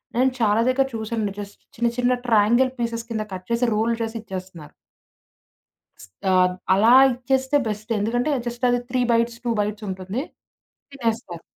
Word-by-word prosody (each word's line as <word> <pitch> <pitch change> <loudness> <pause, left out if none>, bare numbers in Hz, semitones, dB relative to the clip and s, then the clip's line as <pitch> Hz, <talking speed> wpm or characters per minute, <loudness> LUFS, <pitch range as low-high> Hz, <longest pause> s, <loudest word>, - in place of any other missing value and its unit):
నేను 255 +2 +3
చాలా 220 0 +3
దగ్గర 265 +1 +3
చూసాను 220 -2 -3
జస్ట్ 205 0 -9 0.2
చిన్న 235 +1 +1
చిన్న 245 0 +2
ట్రయాంగిల్ 235 +4 +4
పీసెస్ 230 0 -3
కింద 220 -2 -2
కట్ 185 0 -8
చేసి 235 +1 +2
రోల్ 225 +2 +1
చేసి 225 0 -3
ఇచ్చేస్తున్నారు. 185 -6 -9 1.3
స్ 95 - -12 0.2
ఆహ్, 180 0 +4 0.2
అలా 220 +5 +5 0.2
ఇచ్చేస్తే 265 +3 +1
బెస్ట్ 215 +1 -5
ఎందుకంటే 245 +7 0 0.2
జస్ట్ 240 +1 -2
అది 245 - +2
3 255 0 +1
బైట్స్, 235 0 +1
2 235 - +1
బైట్స్ 210 +1 -4
ఉంటుంది. 190 +6 -4 0.7
తినేస్తారు. 225 -9 -3
230 Hz, 150 wpm, -23 LUFS, 205-245 Hz, 1.3 s, అలా